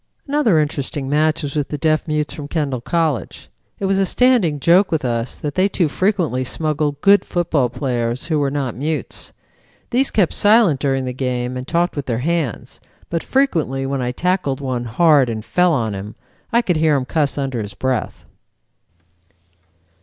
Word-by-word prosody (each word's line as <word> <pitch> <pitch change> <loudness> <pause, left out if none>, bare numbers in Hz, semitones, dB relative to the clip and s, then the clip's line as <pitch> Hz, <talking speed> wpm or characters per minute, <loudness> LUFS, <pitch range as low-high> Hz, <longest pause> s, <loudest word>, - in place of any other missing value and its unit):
"Another 280 - +2
interesting 145 -2 -2
match 155 +2 +1
was 140 -1 -4
with 145 -2 0
the 150 - -4
Deaf 155 +2 +1
Mutes 150 -1 -1
from 145 -2 -7
Kendall 145 -6 -2
College. 160 -1 -2 0.3
It 200 - -3
was 195 0 +1
a 195 - +3
standing 230 - +3
joke 175 +7 +4
with 155 -5 0
us 120 0 -2
that 145 -1 -5
they 185 +4 +2
too 180 -4 +1
frequently 170 - 0
smuggled 150 +1 -1
good 200 0 +5
football 165 -7 0
players 120 -1 -2
who 155 -2 0
were 140 -1 +1
not 135 -3 -2
mutes. 155 +4 -4 0.6
These 260 +3 +2
kept 195 -6 +1
silent 205 - +4
during 135 -2 0
the 125 - -3
game 125 -1 -2
and 125 +1 -6
talked 175 +1 0
with 145 -2 -4
their 115 -3 -1
hands, 165 -8 -2 0.3
but 165 -1 -1
frequently 160 - 0
when 135 0 -2
I 125 0 -1
tackled 175 -2 -1
one 130 -3 -3
hard 140 +2 +4
and 110 -1 -5
fell 180 0 +2
on 115 -8 0
him, 100 +2 -7 0.4
I 235 0 +3
could 180 -6 0
hear 155 -1 +3
him 135 -2 -1
cuss 145 +1 0
under 135 -4 -2
his 105 -1 -7
breath." 130 -3 -3
150 Hz, 180 wpm, -19 LUFS, 130-170 Hz, 0.6 s, good